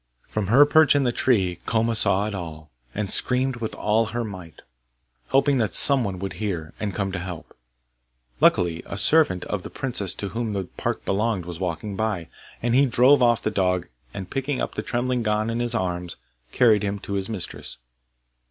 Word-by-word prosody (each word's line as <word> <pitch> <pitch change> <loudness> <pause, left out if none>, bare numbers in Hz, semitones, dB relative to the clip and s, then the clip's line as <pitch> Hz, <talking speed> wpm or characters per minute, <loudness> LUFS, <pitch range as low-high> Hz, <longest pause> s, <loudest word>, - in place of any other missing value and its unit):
From 105 -3 -3
her 135 +8 +6
perch 155 -1 +5
in 140 - +3
the 125 - +1
tree 95 -9 +1
Koma 115 +1 +1
saw 100 -2 +2
it 105 - -4
all, 80 -5 -8 0.2
and 100 -2 -2
screamed 130 0 +1
with 115 -2 -4
all 110 +2 +1
her 120 +2 -3
might, 95 -7 -10 0.6
hoping 135 0 +2
that 110 -6 +1
some 140 -3 +6
one 95 -3 -3
would 95 +1 -5
hear, 85 -8 -4
and 105 -2 -2
come 100 -2 -2
to 95 - -4
help. 90 -2 -8 0.8
Luckily 85 -2 +3
a 100 - -6
servant 100 - +3
of 105 - -3
the - - -8
princess 110 -8 0
to 100 - -4
whom 115 -1 -3
the 100 -1 -2
park 90 - -5
belonged 100 -2 -1
was 85 -1 -7
walking 95 +3 -4
by, 105 -6 -2 0.3
and 120 0 +1
he 135 +2 +4
drove 130 +3 +4
off 120 -2 +3
the 110 - 0
dog, 90 -3 0 0.2
and 95 -2 -8
picking 135 0 -2
up - - -3
the - - -3
trembling 125 0 -1
Gon 110 0 0
in 115 - -2
his 120 -1 -1
arms, 90 -4 -3 0.4
carried 115 -4 +4
him 100 -1 -2
to 100 - -7
his 100 0 -1
mistress. 105 -6 -2
105 Hz, 195 wpm, -24 LUFS, 95-120 Hz, 0.8 s, her